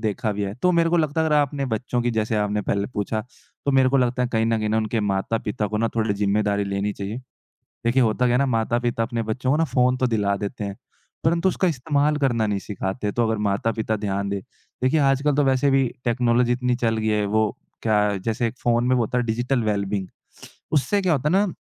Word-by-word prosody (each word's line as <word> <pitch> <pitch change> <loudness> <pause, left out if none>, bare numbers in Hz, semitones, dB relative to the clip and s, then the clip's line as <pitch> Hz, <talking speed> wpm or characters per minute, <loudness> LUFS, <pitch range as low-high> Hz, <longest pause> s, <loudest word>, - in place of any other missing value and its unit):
देखा 110 0 -1
भी 105 0 -3
है। 100 +1 -3
तो 180 - +4
मेरे 170 -1 +3
को 175 - +3
लगता 155 -1 +1
है 160 - +2
अगर 150 - +2
आपने 145 -1 +1
बच्चों 120 +1 -2
की 120 - +1
जैसे 110 -1 -1
आपने 105 0 0
पहले 100 0 -1
पूछा 110 +1 -1 0.4
तो 140 - +2
मेरे 130 -1 +4
को 135 - +2
लगता 125 -1 +1
है, 125 - 0
कहीं 115 -2 +1
न 115 -1 +1
कहीं 105 0 -1
उनके 110 +1 -1
माता-पिता 105 +1 -1
को 105 - -3
ना 115 - +1
थोड़ी 110 -2 +1
ज़िम्मेदारी 100 0 +1
लेनी 100 +1 -2
चाहिए। 100 +5 -5 0.7
देखिए 125 +3 +3
होता 115 +2 +1
क्या 120 - +2
है - - +3
ना 140 - +2
माता-पिता 120 0 0
अपने 115 0 -2
बच्चों 120 +4 -2
को 150 - +3
ना 165 - +2
फ़ोन 125 -4 +2
तो 130 - +1
दिला 100 -4 0
देते 105 +2 -4
हैं। 100 -1 -5 0.5
परंतु 170 +3 +2
उसका 185 0 +1
इस्तेमाल 150 +1 +1
करना 120 -6 +1
नहीं 100 -1 -1
सिखाते 105 +1 -3
तो 120 -1 +1
अगर 110 0 0
माता-पिता 110 +2 -1
ध्यान 100 -1 -2
दें। 100 0 -2 0.4
देखिए 140 +5 +3
आजकल 140 +1 +2
तो 145 - +3
वैसे 135 +1 +2
भी 135 -1 +3 0.2
टेक्नोलॉज़ी 120 0 +2
इतनी 125 0 0
चल 115 -2 0
गई 110 0 -2
है 105 -1 +1
वो 110 +1 +1 0.3
क्या 105 -2 +2
जैसे 115 +1 0
एक 115 - -4
फ़ोन 120 0 +1
में 130 - +4
वो 120 - +2
होता 125 +3 -1
है 120 - 0
डिजिटल 120 +2 0
वेलबिंग 100 -2 -1 0.7
उससे 160 +7 +2
क्या 180 -3 +2
होता 145 +1 +1
है - - 0
ना, 200 +2 +3
115 Hz, 235 wpm, -23 LUFS, 105-130 Hz, 0.7 s, तो